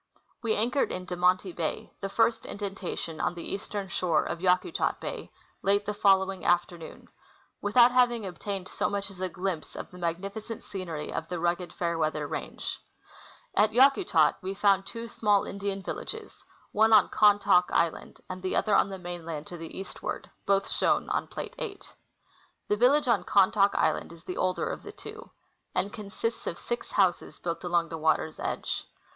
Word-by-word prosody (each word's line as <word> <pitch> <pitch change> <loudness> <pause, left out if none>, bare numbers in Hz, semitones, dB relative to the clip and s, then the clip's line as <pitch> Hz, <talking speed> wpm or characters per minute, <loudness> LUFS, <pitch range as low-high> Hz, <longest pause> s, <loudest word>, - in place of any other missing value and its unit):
We 225 -2 +1
anchored 245 +6 +1
in 185 0 -4
De 180 - -4
Monti 180 +1 +2
bay, 165 -2 -4
the 195 - -2
first 225 +2 +2
indentation 190 -5 -4
on 175 - 0
the 170 - -6
eastern 200 0 -4
shore 175 -1 +1
of 170 - -4
Yakutat 185 - +1
bay, - - -6 0.3
late 200 +1 +2
the 210 - -1
following 195 -2 +3
afternoon, 175 -1 -1 0.5
without 235 +4 +6
having 245 -3 +3
obtained 190 +1 -5
so - - -1
much 200 0 -3
as 185 - -13
a 185 - -1
glimpse 180 -2 -4
of - - -7
the 180 - -11
magnifi 185 +5 -3
cent 225 0 -7
scenery 170 -6 -5
of - - -3
the 180 -1 -3
rugged 175 +1 0
Fairweather 160 -3 -1
range. - - -4 0.8
At 210 +2 +4
Yakutat 260 - +5
we 190 +1 -4
found 195 -1 +3
two 230 0 -6
small 210 -3 +2
Indian 200 -1 -4
villages, - - -6 0.3
one 220 +1 +4
on - - +7
Khan 210 -1 +6
taak 195 -3 +4
island 165 -1 0
and 185 0 -6
the 185 - -1
other 215 - +2
on 200 - +4
the 195 - -5
mainland 170 -4 -6
to 175 - -8
the 165 -1 -8
eastward 190 - -6 0.2
(both 195 0 +3
shown - - +1
on - - 0
plate - - -6
8). - - -6 0.8
The 210 - +3
village 260 +6 +4
on 235 -4 +3
Khantaak 200 0 +4
island - - +1
is 170 0 -13
the 180 - -5
older 185 0 0
of - - -4
the - - -9
two, - - -10 0.5
and 200 - 0
consists 215 +2 -4
of 170 - -3
six 240 0 -4
houses 185 -3 +2
built 170 0 -4
along 175 -1 +1
the 165 - -5
water's 160 0 +1
edge. - - -3
195 Hz, 175 wpm, -28 LUFS, 175-205 Hz, 0.8 s, on